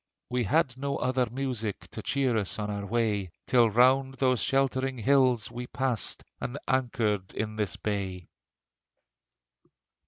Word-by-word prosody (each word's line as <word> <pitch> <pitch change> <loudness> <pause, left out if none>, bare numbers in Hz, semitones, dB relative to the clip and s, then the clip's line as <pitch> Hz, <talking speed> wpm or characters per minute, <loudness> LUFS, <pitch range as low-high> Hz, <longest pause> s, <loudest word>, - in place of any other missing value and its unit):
We 125 -1 +1
had 135 - +2
no 140 +1 -2
other 130 -1 +1
music 120 -5 -3
To - - -6
cheer 135 -4 +1
us 105 -4 -1
on 105 -1 -3
our 100 0 -4
way: 105 -4 0 0.2
Till 120 -3 +4
round 130 +4 +4
those 130 -3 +2
sheltering 135 -1 +1
hills 130 -1 +3
we 120 +1 -6
passed 125 -5 -2 0.2
And 125 - -4
anchored 115 -7 0
in 110 0 -3
this 105 -5 -1
bay. 95 -4 -3
120 Hz, 135 wpm, -28 LUFS, 105-130 Hz, 0.2 s, Till